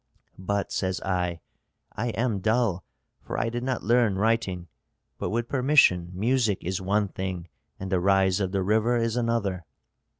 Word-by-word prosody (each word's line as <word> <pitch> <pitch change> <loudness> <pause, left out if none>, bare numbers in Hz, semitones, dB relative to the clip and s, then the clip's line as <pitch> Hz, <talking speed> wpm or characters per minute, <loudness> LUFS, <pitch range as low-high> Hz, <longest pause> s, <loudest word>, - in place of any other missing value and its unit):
'But,' 100 +2 -2
says 95 -1 -1
I, 90 -3 -2 0.5
'I 110 +3 -3
am 115 -4 0
dull, 110 -3 +1 0.4
for - - -5
I 115 - 0
did 120 +1 -4
not 130 0 -2
learn 115 -3 +3
writing; 100 -5 0 0.5
but - - -2
with 120 +2 -1
permission 125 - +4
music 110 0 +1
is 95 +2 -2
one 100 +1 +1
thing 90 -2 -5 0.3
and 95 0 -6
the 95 - +2
rise 95 0 +3
of 95 -2 -1
the 95 -1 0
river 110 +4 +2
is 115 -1 0
another.' 115 -7 -1
100 Hz, 160 wpm, -26 LUFS, 95-115 Hz, 0.5 s, permission